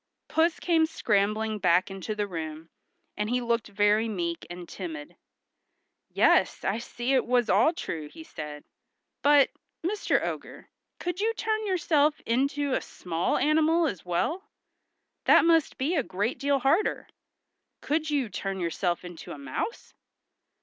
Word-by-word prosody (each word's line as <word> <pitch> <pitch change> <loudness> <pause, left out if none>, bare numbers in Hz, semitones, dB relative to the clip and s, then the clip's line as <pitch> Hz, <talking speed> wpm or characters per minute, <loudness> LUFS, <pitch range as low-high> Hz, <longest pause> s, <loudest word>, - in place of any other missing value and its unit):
Puss 325 +1 +2
came 325 -2 +3
scrambling 215 -5 0
back 185 0 +3
into 195 +3 -4
the 210 -1 -1
room, 160 -3 -6 0.4
and 210 +1 -2
he 250 +1 +1
looked 235 -2 0
very 205 +2 +2
meek 170 -4 -3
and 175 0 -8
timid. 315 -3 -7 0.9
"Yes, - - +3
I 200 +4 0
see 240 +2 -2
it 260 - +4
was 245 -1 +2
all 215 - +5
true," 160 - -5
he 320 - -11
said. 150 - -8 0.6
"But, 285 -1 +5 0.3
Mr. 405 +3 +1
Ogre, - - -7 0.3
could 355 +1 -4
you 455 +1 +1
turn 435 -1 -1
yourself 310 -5 +2
into 275 +3 0
a - - +1
small 170 -1 -2
animal 320 +2 +3
as 195 - -3
well? 320 - -2 0.8
That - - +6
must 330 -2 +3
be 285 +7 0
a 295 - +3
great 205 +1 -2
deal 280 0 +2
harder. 280 - +1 0.7
Could 310 +1 -1
you 285 -5 +1
turn 195 -1 -4
yourself 175 +1 -1
into 175 -2 -8
a - - -9
mouse?" 140 - -5
240 Hz, 145 wpm, -27 LUFS, 190-315 Hz, 0.9 s, That